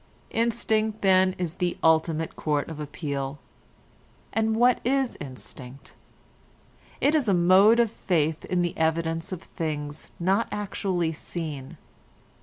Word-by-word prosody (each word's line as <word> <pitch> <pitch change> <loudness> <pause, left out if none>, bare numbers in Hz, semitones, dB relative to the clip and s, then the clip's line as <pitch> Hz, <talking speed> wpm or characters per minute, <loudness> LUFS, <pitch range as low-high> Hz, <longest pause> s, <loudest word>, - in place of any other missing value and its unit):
Instinct 220 -2 0
then 185 -1 +4
is 175 -3 -3
the 175 -1 0
ultimate 160 0 +2
court 150 -1 -1
of 160 -2 -7
appeal. 145 -2 -4 1.0
And 220 0 +1
what 245 +2 +4
is 265 0 +1
instinct? 130 0 -9 1.1
It 290 - +3
is 290 -8 +2
a 195 - +4
mode 190 +6 +6
of 230 -3 +3
faith 160 -3 0
in 180 -1 0
the 175 - -2
evidence 165 +1 0
of 185 - -5
things 150 -2 -5
not 195 +6 +2
actually 190 -5 -1
seen. 150 -4 -6
175 Hz, 125 wpm, -26 LUFS, 155-215 Hz, 1.1 s, mode